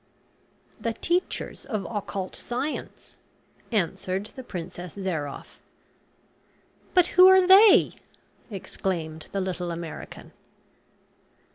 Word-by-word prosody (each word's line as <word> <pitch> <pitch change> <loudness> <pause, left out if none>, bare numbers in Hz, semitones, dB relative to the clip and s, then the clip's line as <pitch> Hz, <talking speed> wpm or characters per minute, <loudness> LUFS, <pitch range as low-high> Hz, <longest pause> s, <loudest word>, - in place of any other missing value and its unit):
"The 230 - -2
teachers 350 +9 -2
of 215 -8 -4
occult 200 -3 -4
science," 260 +5 -5 0.5
answered 195 0 -2
the 260 - -7
Princess 180 -5 -7
Zairoff. 165 -8 -5 1.4
"But 360 -2 +6
who 365 +1 +10
are 380 -1 +7
they?" 390 +3 +7 0.6
exclaimed 175 -5 -4
the 200 - -2
little 180 -2 -3
American. 170 -1 -8
195 Hz, 90 wpm, -26 LUFS, 175-260 Hz, 1.4 s, who